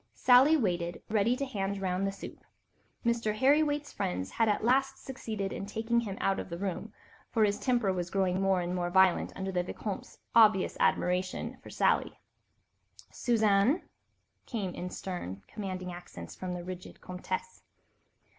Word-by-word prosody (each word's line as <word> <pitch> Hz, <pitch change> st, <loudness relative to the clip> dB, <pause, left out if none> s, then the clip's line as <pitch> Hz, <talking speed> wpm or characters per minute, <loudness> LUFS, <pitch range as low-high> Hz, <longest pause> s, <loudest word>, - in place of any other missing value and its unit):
Sally 265 Hz, +5 st, +6 dB
waited, 175 Hz, -, -1 dB
ready 220 Hz, +3 st, +3 dB
to 275 Hz, -, -2 dB
hand 200 Hz, -6 st, -2 dB
round 190 Hz, 0 st, 0 dB
the -, -, -1 dB
soup. 195 Hz, -, -10 dB, 0.6 s
Mr. 230 Hz, -2 st, +1 dB
Harry 275 Hz, +6 st, +5 dB
Waite's 290 Hz, -1 st, -1 dB
friends 90 Hz, +1 st, -2 dB
had 225 Hz, -1 st, +2 dB
at 210 Hz, -, +1 dB
last 270 Hz, +3 st, +2 dB
succeeded 215 Hz, -7 st, -5 dB
in 195 Hz, -, -5 dB
taking 225 Hz, +3 st, 0 dB
him 200 Hz, -4 st, -4 dB
out 195 Hz, -, +1 dB
of -, -, -6 dB
the 170 Hz, -, -5 dB
room, 200 Hz, +3 st, -4 dB, 0.4 s
for 225 Hz, -, +2 dB
his 205 Hz, -1 st, +2 dB
temper 240 Hz, -7 st, +1 dB
was 175 Hz, -1 st, -3 dB
growing 190 Hz, -1 st, +1 dB
more 195 Hz, -2 st, +2 dB
and 175 Hz, +1 st, -2 dB
more 175 Hz, -1 st, -1 dB
violent 190 Hz, 0 st, +4 dB
under 190 Hz, 0 st, -3 dB
the 180 Hz, -1 st, +1 dB
Vicomte's 195 Hz, +2 st, -6 dB, 0.2 s
obvious 215 Hz, -4 st, +5 dB
admiration 180 Hz, +1 st, 0 dB
for -, -, -12 dB
Sally. -, -, +1 dB, 0.9 s
"Suzanne," 220 Hz, -, +3 dB, 0.6 s
came 200 Hz, -7 st, -3 dB
in 180 Hz, -, -5 dB
stern, 100 Hz, -, -6 dB
commanding 185 Hz, -3 st, -5 dB
accents 175 Hz, 0 st, -9 dB
from 180 Hz, -1 st, -4 dB
the 175 Hz, -, -6 dB
rigid 185 Hz, 0 st, -8 dB
Comtesse. 185 Hz, -, -5 dB
195 Hz, 160 wpm, -30 LUFS, 180-230 Hz, 0.9 s, Sally